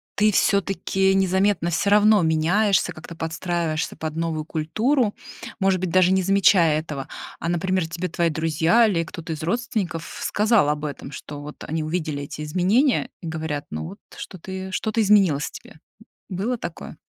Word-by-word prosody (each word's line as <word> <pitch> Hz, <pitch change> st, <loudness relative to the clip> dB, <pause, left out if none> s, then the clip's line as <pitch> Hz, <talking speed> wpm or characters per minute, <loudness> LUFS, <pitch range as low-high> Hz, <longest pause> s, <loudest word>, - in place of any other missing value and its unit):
ты 215 Hz, +1 st, +3 dB
всё-таки 195 Hz, -1 st, +2 dB
незаметно 190 Hz, -2 st, +2 dB
всё 175 Hz, +4 st, 0 dB
равно 210 Hz, 0 st, +5 dB
меняешься, 180 Hz, +5 st, +2 dB
как-то 160 Hz, +2 st, -10 dB
подстраиваешься 165 Hz, 0 st, -2 dB
под 155 Hz, -1 st, -5 dB
новую 165 Hz, -2 st, -2 dB
культуру, 215 Hz, -, 0 dB, 0.4 s
может 190 Hz, -1 st, +2 dB
быть, 185 Hz, 0 st, -2 dB
даже 185 Hz, +1 st, +4 dB
не 190 Hz, 0 st, +3 dB
замечая 185 Hz, -4 st, +4 dB
этого? 150 Hz, -4 st, -6 dB, 0.3 s
А, 165 Hz, -, -4 dB
например, 180 Hz, 0 st, 0 dB
тебе 170 Hz, +2 st, -4 dB
твои 170 Hz, +1 st, +1 dB
друзья 160 Hz, +8 st, +3 dB
или 175 Hz, -6 st, +1 dB
кто-то 165 Hz, 0 st, -8 dB
из 150 Hz, -, -7 dB
родственников 185 Hz, -3 st, -3 dB
сказал 210 Hz, -6 st, +2 dB
об 150 Hz, 0 st, -1 dB
этом, 145 Hz, -1 st, -6 dB
что 145 Hz, 0 st, -8 dB
вот 150 Hz, +1 st, -9 dB
они 160 Hz, 0 st, -3 dB
увидели 155 Hz, -3 st, -3 dB
эти 145 Hz, -, -7 dB
изменения, 190 Hz, -, +2 dB
и 170 Hz, -, -6 dB
говорят: 160 Hz, -2 st, -3 dB
"Ну 80 Hz, +1 st, -4 dB
вот -, -, -10 dB, 0.2 s
что-то 185 Hz, +1 st, -9 dB
и 190 Hz, 0 st, -5 dB
что-то 220 Hz, +4 st, 0 dB
изменилось 195 Hz, -9 st, +4 dB
в -, -, -6 dB
тебе". -, -, -12 dB, 0.5 s
Было 210 Hz, +6 st, -2 dB
такое? 170 Hz, -4 st, -7 dB
175 Hz, 165 wpm, -23 LUFS, 160-195 Hz, 0.5 s, равно